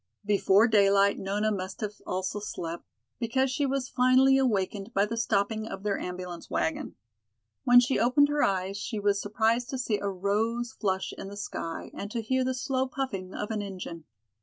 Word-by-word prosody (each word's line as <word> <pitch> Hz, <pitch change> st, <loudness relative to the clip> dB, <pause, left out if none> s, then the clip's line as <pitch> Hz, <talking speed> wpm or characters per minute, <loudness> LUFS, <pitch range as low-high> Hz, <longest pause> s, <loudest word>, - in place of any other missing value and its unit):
Before 205 Hz, +1 st, +4 dB
daylight 200 Hz, -2 st, +4 dB
Nona 205 Hz, +3 st, 0 dB
must 190 Hz, -1 st, -4 dB
have 210 Hz, -1 st, -5 dB
also 190 Hz, +2 st, -2 dB
slept, 170 Hz, -4 st, -6 dB, 0.3 s
because 255 Hz, +3 st, +1 dB
she 280 Hz, +1 st, 0 dB
was 270 Hz, -1 st, -1 dB
finally 260 Hz, +1 st, +4 dB
awakened 210 Hz, -4 st, 0 dB
by 200 Hz, +1 st, +4 dB
the 225 Hz, +2 st, -4 dB
stopping 220 Hz, -1 st, 0 dB
of 195 Hz, -2 st, -7 dB
their 205 Hz, -1 st, 0 dB
ambulance 180 Hz, -1 st, -6 dB
wagon. 160 Hz, -, -2 dB, 0.7 s
When 245 Hz, 0 st, +8 dB
she 245 Hz, +2 st, +2 dB
opened 255 Hz, +5 st, +4 dB
her 295 Hz, 0 st, +1 dB
eyes 190 Hz, 0 st, 0 dB
she 215 Hz, +2 st, -4 dB
was 200 Hz, 0 st, +1 dB
surprised 225 Hz, +3 st, +1 dB
to 265 Hz, -, -3 dB
see 230 Hz, -4 st, -1 dB
a 200 Hz, -, -2 dB
rose 220 Hz, +5 st, -1 dB
flush 190 Hz, -2 st, -2 dB
in -, -, -7 dB
the 200 Hz, +1 st, -8 dB
sky 165 Hz, -4 st, -5 dB
and 200 Hz, -, -6 dB
to 235 Hz, -, -3 dB
hear 260 Hz, +4 st, +1 dB
the 260 Hz, 0 st, -1 dB
slow 260 Hz, +1 st, -1 dB
puffing 225 Hz, -9 st, -4 dB
of 210 Hz, +1 st, -4 dB
an 215 Hz, -1 st, -1 dB
engine. 180 Hz, -5 st, -7 dB
210 Hz, 185 wpm, -28 LUFS, 195-245 Hz, 0.7 s, When